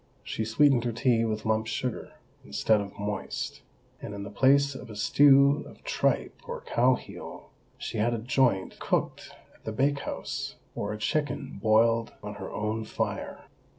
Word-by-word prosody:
She 110 - -3
sweetened 125 +2 +4
her 120 - 0
tea 115 -1 +2
with 110 -1 -2
lump 110 0 +1
sugar, 125 0 -3 0.3
instead 105 +10 +2
of 100 -1 -8
moist; 105 0 -4 0.4
and 100 - -6
in 100 - -5
the 100 - -7
place 140 +5 +4
of 130 -2 -9
a 105 - -8
stew 140 +6 +5
of - - -17
tripe - - 0
or - - -5
cow 125 +2 +3
heel, - - -10 0.3
she 115 - -4
had 120 +2 +2
a - - -2
joint 120 -4 +1
cooked - - -1 0.2
at - - -26
the 110 - -4
bake 140 +5 +1
house, - - -4 0.2
or 100 - -3
a 105 - -4
chicken 145 +4 -2
boiled 115 +1 +3
on 105 0 -5
her - - -5
own 110 +1 -2
fire. 110 - -4
115 Hz, 170 wpm, -28 LUFS, 105-130 Hz, 0.4 s, stew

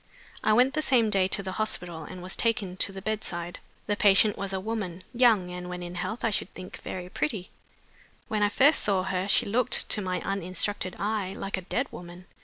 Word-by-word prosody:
"'I 215 - +4
went 250 +4 +5
the 310 - 0
same 240 -7 +3
day 190 -2 +4
to 200 +1 -2
the 190 - -4
hospital, 175 -6 -2
and 180 +3 -9
was 185 - -3
taken 215 -5 +1
to 195 - -1
the 190 -1 -8
bedside. 175 -5 -3 0.3
"'The 205 - 0
patient 205 +1 +5
was 195 0 -4
a 190 - -1
woman 190 -4 -4
young, 225 -7 +4
and 180 0 -6
(when 180 0 -5
in 175 0 -6
health), 195 +6 -4
I 230 - +2
should 200 - -1
think, 185 0 -8
very 180 -1 -5
pretty. 180 +3 -3 0.8
When 215 -1 -1
I 205 - +4
first 285 +8 +4
saw 195 -3 +1
her 190 0 -1
she - - +4
looked, 230 +3 +2
to 210 - +2
my 185 -1 -1
uninstructed 185 0 -1
eye, 205 -2 -1
like 195 - -2
a 190 - -4
dead 255 - +1
woman. 175 +1 -10
195 Hz, 210 wpm, -28 LUFS, 180-215 Hz, 0.8 s, went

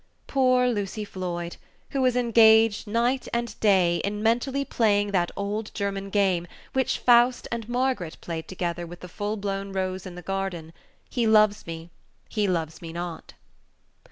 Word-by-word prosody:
Poor 255 -2 +3
Lucy 210 -2 -2
Floyd, 175 -3 -5 0.3
who 275 - 0
was 255 -1 +3
engaged, 225 -3 +5
night 240 +5 0
and 235 -1 -3
day, 185 -5 +4
in 210 +3 -3
mentally 255 +5 +1
playing 205 -5 +2
that 175 -3 +1
old 210 +2 -3
German 195 -1 -3
game 190 -4 +1 0.3
which 265 -1 +1
Faust 245 +1 +4
and 235 -1 -4
Margaret 245 -9 -1
played 165 -2 -5
together 175 -2 -3
with 175 +1 -11
the 180 - -8
full 205 +4 -3
blown 195 -1 -3
rose 185 0 -3
in 180 - -9
the 180 - -9
garden 190 -4 -4 0.3
"He 235 -3 0
loves 215 -2 +4
me 165 +1 -7 0.4
loves 175 -7 -1
me 165 -1 -7
not!" 170 0 -6
200 Hz, 155 wpm, -26 LUFS, 180-230 Hz, 0.4 s, engaged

